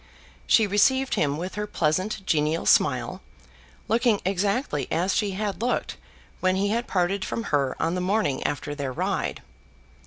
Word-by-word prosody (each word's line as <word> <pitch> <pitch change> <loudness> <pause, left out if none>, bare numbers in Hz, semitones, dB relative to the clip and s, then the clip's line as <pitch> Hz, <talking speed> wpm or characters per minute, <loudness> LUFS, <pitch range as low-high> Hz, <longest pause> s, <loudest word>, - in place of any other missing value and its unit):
She 220 - +5
received 260 +7 +2
him 145 -1 +1
with 180 +3 -5
her 210 0 -3
pleasant 185 +4 -1
genial 155 0 +1
smile, - - +2 0.7
looking 230 -2 +2
exactly 195 - 0
as 185 +3 +1
she 205 -2 0
had 205 +1 -3
looked 245 +1 -1 0.4
when 185 0 +2
he 200 +1 +1
had 235 +3 -1
parted 190 +1 0
from 230 - -3
her 140 -3 +1
on 165 - 0
the 180 - -1
morning 185 -7 0
after 145 0 -2
their 140 -3 -4
ride. 125 - -2
190 Hz, 155 wpm, -25 LUFS, 155-210 Hz, 0.7 s, She